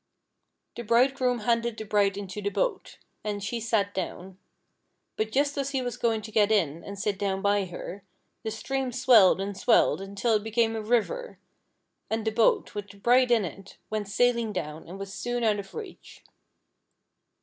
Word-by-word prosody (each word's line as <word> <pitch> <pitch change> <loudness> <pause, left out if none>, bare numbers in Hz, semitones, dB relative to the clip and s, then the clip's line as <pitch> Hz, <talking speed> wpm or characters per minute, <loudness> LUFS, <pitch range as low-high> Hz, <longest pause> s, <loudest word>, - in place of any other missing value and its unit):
The - - -5
Bridegroom 250 +1 +2
handed 235 0 0
the 220 - -6
bride 200 -2 +2
into 200 0 -6
the 205 - -1
boat, - - -2 0.3
and 205 -1 -3
she 235 +4 -2
sat 215 -3 0
down; 185 0 -5 0.8
but 215 0 -2
just 285 +3 +1
as 275 0 -1
he 270 -2 -1
was 245 -1 -3
going 225 -2 0
to 220 - -8
get 210 -1 +3
in 170 -6 +1
and 200 0 -8
sit 200 0 -2
down 195 -1 -1
by 200 -1 +2
her, 185 +2 -8 0.4
the 220 - -3
stream 260 +4 -3
swelled 220 -7 +6
and 200 +1 -3
swelled 225 -1 +3
until 200 +4 -1
it 210 -1 +2
became 225 0 +1
a 220 - -2
river, 245 - -1 0.7
and 220 0 -2
the 220 - +1
boat, 220 0 +2
with 205 -1 -6
the 200 - -14
bride 245 +4 +4
in 230 -4 +3
it, 195 +3 -10
went 215 -2 -2
sailing 235 +1 +2
down, 155 -5 -5
and 180 +3 -8
was 195 0 -7
soon 245 0 -2
out 215 -2 +2
of 195 - -9
reach. 425 -5 -10
215 Hz, 185 wpm, -27 LUFS, 200-240 Hz, 0.8 s, swelled